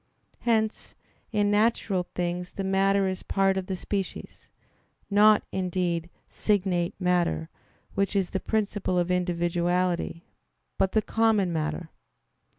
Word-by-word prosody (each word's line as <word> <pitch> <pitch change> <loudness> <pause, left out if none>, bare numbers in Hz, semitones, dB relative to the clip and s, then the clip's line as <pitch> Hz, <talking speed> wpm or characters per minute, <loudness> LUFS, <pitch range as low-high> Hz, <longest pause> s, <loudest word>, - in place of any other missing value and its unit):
Hence 220 -2 0 0.4
in 205 -2 +2
natural 205 -4 +1
things 180 0 -2
the 195 - -4
matter 195 0 +2
is 185 -1 -3
part 195 -1 +1
of 190 -1 -3
the 190 - -2
species; 195 0 -5 0.6
not, 210 +1 +6
indeed, 180 -2 -1 0.2
signate 180 -4 0
matter, 175 -3 +1 0.4
which 200 +1 0
is 195 -3 +1
the 190 - -1
principle 205 -4 -1
of 175 0 +1
individuality; 175 0 0 0.5
but 190 - +2
the 220 - +3
common 220 -5 +2
matter. 160 +1 -3
190 Hz, 120 wpm, -27 LUFS, 175-205 Hz, 0.6 s, not